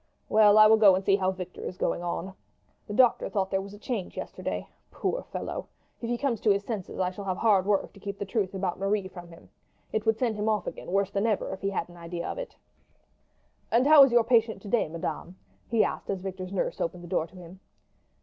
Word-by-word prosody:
Well, 210 -1 +6
I 215 - +9
will 220 +1 +7
go 200 -4 +7
and 190 +1 -3
see 195 - +5
how 185 -2 +1
Victor 185 -1 -6
is 180 - -6
going - - -1
on. 175 +2 -4 0.5
The 205 - -5
doctor 250 0 +4
thought 195 -3 -1
there 190 0 +1
was 200 +1 -9
a - - -12
change 210 -3 -5
yesterday. - - -4 0.2
Poor - - -2
fellow! - - -5 0.3
If 230 - -4
he 240 - 0
comes 245 -4 -1
to 220 - +2
his 200 0 +3
senses 205 -4 -5
I 185 -1 +1
shall 195 +2 -8
have 185 -1 -2
hard 200 -4 +3
work 205 -2 +1
to 200 - -15
keep 200 0 -6
the 200 - -4
truth 195 -2 -2
about 185 -2 -2
Marie 195 0 0
from 175 -2 -10
him. 165 0 -15 0.5
It 220 +1 -1
would 225 0 +3
send 230 -3 0
him 210 +1 0
off 215 -1 0
again - - -7
worse 195 0 +1
than 200 +2 0
ever 210 -3 -1
if 190 - -8
he 195 - 0
had 185 -4 -2
an 175 0 -15
idea 170 0 -5
of - - -4
it." - - -7 1.1
"And 235 +3 +3
how 295 -1 +9
is 270 - +4
your 235 -1 +5
patient 225 -3 +2
to - - -9
day, 235 -5 +2
madame?" 170 +2 -5 0.3
he 230 -2 +3
asked, - - -4
as 195 - -1
Victor's 185 -1 -6
nurse 195 - -2
opened 175 +1 -3
the - - -9
door 165 -1 0
to 175 - -20
him. 180 +1 -12
200 Hz, 245 wpm, -27 LUFS, 185-220 Hz, 1.1 s, I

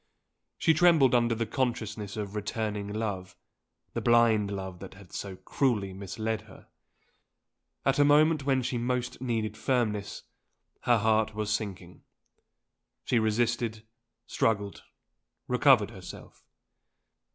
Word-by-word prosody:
She 160 - +3
trembled 160 -6 +5
under 120 -1 +3
the 115 +1 -1
consciousness 110 -5 -3
of 105 -2 -4
returning 105 -1 -3
love 100 -4 -4 0.6
the - - -2
blind 115 -3 +4
love 95 -2 -5
that 95 -1 -10
had 100 -1 -15
so 100 -2 -5
cruelly 105 -3 -1
misled 110 +3 -3
her! 95 - -16 1.2
At 135 +1 +2
a - - +7
moment 150 +1 +4
when 135 -2 +1
she 120 0 -2
most 125 0 -2
needed 115 -4 -2
firmness, 110 -4 -1 0.6
her 120 -1 +5
heart 110 0 +1
was 105 0 -2
sinking; 95 -5 -5 1.0
she 120 - +2
resisted, 115 0 0 0.4
struggled, 100 -3 -1 0.7
recovered - - +4
herself. - - -11
110 Hz, 120 wpm, -28 LUFS, 100-120 Hz, 1.2 s, a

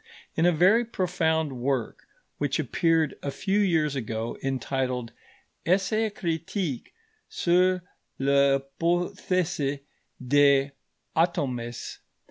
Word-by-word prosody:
In 165 +2 +3
a - - +5
very 185 +8 +4
profound 160 - -1
work 130 -2 -2 0.3
which 145 -2 0
appeared 160 +2 +1
a 140 - -3
few 195 +8 0
years 160 -7 +2
ago, 115 -2 -3
entitled 130 -2 -2 0.5
Essai 200 +5 +1
critique 165 - -3 0.3
sur 180 +1 +2 0.3
l'hypothese 140 +3 +1 0.4
des 140 +1 +4 0.4
atomes, 130 -8 -1
M. - - -40
150 Hz, 95 wpm, -26 LUFS, 135-180 Hz, 0.5 s, a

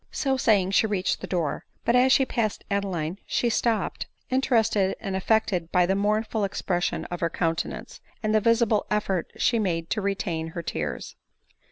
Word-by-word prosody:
So 270 -2 0
saying 205 -7 +3
she 220 - +3
reached 200 -3 -1
the - - -5
door; 170 -5 -1 0.2
but 235 - +3
as 255 +1 +5
she 265 - +5
passed 225 -5 -2
Adeline 190 -3 -2
she 240 - +1
stopped, 225 0 0 0.2
interested 225 -7 +2
and 195 -1 -4
affected 190 -4 +1
by 180 -1 +4
the 190 - +1
mournful 215 +2 0
expres 180 -2 -1
sion - - -2
of 175 - -3
her 170 - 0
countenance, 165 0 -3 0.2
and 215 0 +1
the 215 - +4
visible 230 -1 +2
effort 195 -4 -1
she 235 - +2
made 165 -5 -1
to 215 - 0
retain 190 -5 -2
her 170 +1 -6
tears. - - -4
200 Hz, 175 wpm, -26 LUFS, 180-220 Hz, 0.2 s, as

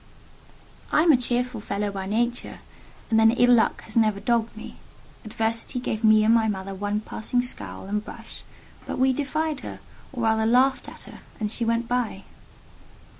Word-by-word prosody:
"I 305 - +4
am 335 - +6
a - - +6
cheerful 245 -1 -1
fellow 205 0 -2
by 195 -1 -5
nature: 240 +4 -2 0.5
and 220 - +4
then 225 0 +6
ill 245 +1 +4
luck 225 -2 +2
has 220 - -11
never 215 -3 +3
dogged 230 0 0
me. 220 - -10 0.5
Adversity 225 +3 -2
gave 225 -2 -3
me 215 -1 +6
and 220 +1 +4
my 225 -1 +3
mother 195 -2 -3
one 205 +2 -2
passing 245 +3 -2
scowl 95 - -3
and 210 +2 -2
brush, - - -10 0.4
but - - -4
we 260 +1 +3
defied 300 +2 -2
her, - - -8 0.3
or 245 -3 -4
rather 220 0 +2
laughed 260 +3 +3
at - - -12
her, - - -12 0.2
and 210 -2 -2
she 235 - -3
went 230 +1 0
by.". 235 -5 -2
225 Hz, 175 wpm, -25 LUFS, 215-245 Hz, 0.5 s, am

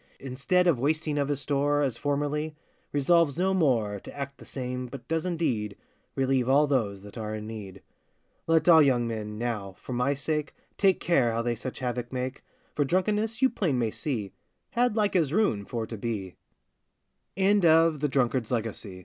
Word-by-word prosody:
Instead 140 +8 +1
of 165 -8 +3
wasting 150 +2 0
of 140 - +1
his 145 -1 -2
store, 145 +1 +1
As 130 -4 0
formerly, 145 +2 -1 0.4
resolves 150 +1 +3
no 190 +2 +2
more 120 - +1
To - - -11
act 140 0 -5
the - - -12
same, 125 -1 -4
but 120 -1 -10
does 165 +2 -1
indeed 120 - -1 0.4
Relieve 130 -2 +1
all 145 +3 +5
those 110 -9 -1
that 105 +3 -9
are 110 0 -4
in 105 0 -6
need. 100 -4 -8 0.6
Let 165 0 +3
all 165 -2 +8
young 130 -5 +3
men 105 -2 -4
now, 110 -5 -3
for 125 - -8
my 125 +4 +1
sake, 150 +1 -3 0.2
Take 195 -2 +3
care 135 -9 +2
how 115 +1 -1
they 120 0 0
such 125 +2 -6
havoc 125 -1 -3
make; 130 +1 -4 0.3
For 145 - +1
drunkenness, 210 - 0
you 260 - +6
plain 175 - 0
may 115 -3 0
see, 115 - -3 0.4
Had 245 -2 +1
like 210 -3 +1
his 165 -7 +2
ruin 160 - +1
fo 115 -1 -3
140 Hz, 160 wpm, -27 LUFS, 120-160 Hz, 0.6 s, all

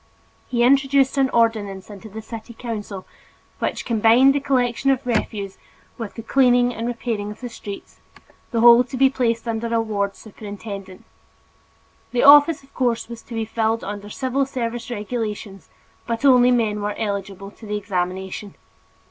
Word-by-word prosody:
He 240 -1 +1
introduced 270 +1 +3
an 265 -1 +3
ordinance 215 -5 0
into 205 +2 -10
the 220 +2 -8
city 225 +1 -9
council 210 -5 -6 0.5
which - - -2
combined 235 +4 +5
the 285 - +1
collection 265 -2 0
of 270 -1 +1
refuse 210 -4 -2 0.4
with 225 -3 -6
the 230 - -7
cleaning 245 -1 +3
and 230 +1 -4
repairing 230 -4 -3
of 210 - -9
the 245 - -5
streets, 205 -3 -9 0.5
the 230 -2 0
whole 240 +1 +8
to 255 +1 -7
be 265 0 +4
placed 235 -3 -1
under 230 0 -2
a 230 - +2
ward 200 -3 -2
superintendent. 200 -3 -9 1.1
The 245 - +2
office 290 +1 +7
of 270 - -23
course 240 -3 -1
was 235 -1 -8
to 235 - -10
be 225 0 -1
filled 225 0 -1
under 205 0 -6
civil 260 +4 -1
service 240 -3 -4
regulations 210 -3 -5 0.4
but 230 +3 -2
only 250 -2 +6
men 220 -4 +1
were 205 0 -2
eligible 200 -2 -4
to 220 - -13
the 210 0 -2
examination. 190 0 -4
230 Hz, 160 wpm, -22 LUFS, 205-245 Hz, 1.1 s, whole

